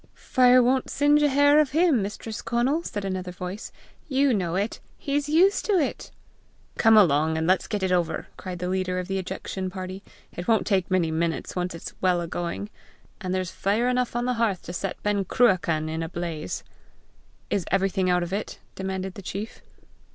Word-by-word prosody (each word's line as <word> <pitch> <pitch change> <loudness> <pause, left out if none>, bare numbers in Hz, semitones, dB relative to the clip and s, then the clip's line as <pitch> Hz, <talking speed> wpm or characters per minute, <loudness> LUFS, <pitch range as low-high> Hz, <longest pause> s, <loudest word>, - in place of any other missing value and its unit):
"Fire 255 -2 +4
won't 255 +1 +1
singe 290 +1 +3
a 295 - +4
hair 285 +2 +5
of 295 -3 +2
him, 320 - +4
Mistress 210 +2 -5
Conal," 240 +7 +1
said 205 -11 -5
another 185 -1 -3
voice. 180 +3 -6 0.4
"You 275 -2 +2
know 180 -5 -1
it; 200 +4 -1 0.2
he's 290 +1 -2
used 370 +6 +4
to 425 - +1
it!" 325 -8 0 0.7
"Come 225 -1 +6
along, 160 -4 +4
and 160 - 0
let's 185 +2 +2
get 210 -3 -2
it 190 - +1
over!" 170 -3 0
cried 185 -2 -6
the 180 +1 -3
leader 185 0 -1
of 180 -1 -3
the 195 0 -1
ejection 190 0 -4
party. 185 0 -6 0.3
"It 175 - -6
won't 225 -2 +3
take 190 -3 +1
many 180 -4 +1
minutes 165 +1 -2
once 180 -1 -2
it's 165 - -8
well 180 -2 +3
a 170 - -3
going, 175 +5 -4 0.5
and 185 -2 -3
there's 185 -1 -1
fire 215 +5 0
enough 250 -1 0
on 240 0 0
the 250 - +1
hearth 205 -6 +1
to 175 - -7
set 180 +1 -4
Ben 205 -1 +1
Cruachan 175 -7 +2
in 160 +1 -3
a 165 - -3
blaze!" 170 -3 -4 0.9
"Is 195 -4 0
everything 190 -1 +1
out 180 0 +2
of 175 +2 -5
it?" 205 +2 -3 0.2
demanded 190 0 -4
the 200 - -9
chief. 200 +3 -6
190 Hz, 195 wpm, -25 LUFS, 180-240 Hz, 0.9 s, Come